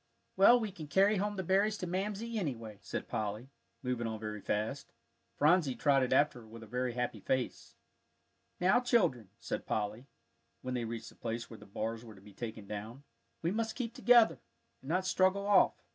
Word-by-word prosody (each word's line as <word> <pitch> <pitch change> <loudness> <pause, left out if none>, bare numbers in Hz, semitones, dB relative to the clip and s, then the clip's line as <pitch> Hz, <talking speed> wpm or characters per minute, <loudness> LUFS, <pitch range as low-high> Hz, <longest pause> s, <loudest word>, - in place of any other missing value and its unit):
"Well, 220 +6 +7
we 220 -3 -3
can 160 -5 -9
carry 195 +7 +4
home 205 +2 -1
the 190 - -3
berries 200 +4 +2
to 180 - -4
Mamsie, 210 +5 -2
anyway," 115 - -4
said - - -5
Polly, 110 +5 -3 0.3
moving 125 -2 -1
on 110 -1 -4
very 105 -1 -5
fast. 110 +9 -3 0.4
Phronsie 150 -3 +3
trotted 135 -3 +2
after 130 -2 +3
her 110 - -15
with 115 +1 -11
a - - -9
very 125 +2 -2
happy 125 -2 -2
face. 130 +5 -2 0.8
"Now, 185 +6 +4
children," 175 - +1
said - - -4
Polly, 110 +4 -2 0.6
when 130 - -3
they 120 -2 -1
reached 115 0 -5
the - - -18
place 115 +1 -5
where 115 - -9
the - - -14
bars 110 +3 -4
were 110 -3 -11
to - - -15
be 100 0 -15
taken 110 -1 -6
down, 110 +6 -7 0.4
"we 170 - +1
must 225 +1 -1
keep 235 -3 -3
together, 230 - +5 0.4
and 135 - -10
not 185 +3 +1
straggle 190 +1 +2
off. 200 -2 +5
130 Hz, 190 wpm, -33 LUFS, -, 0.8 s, Well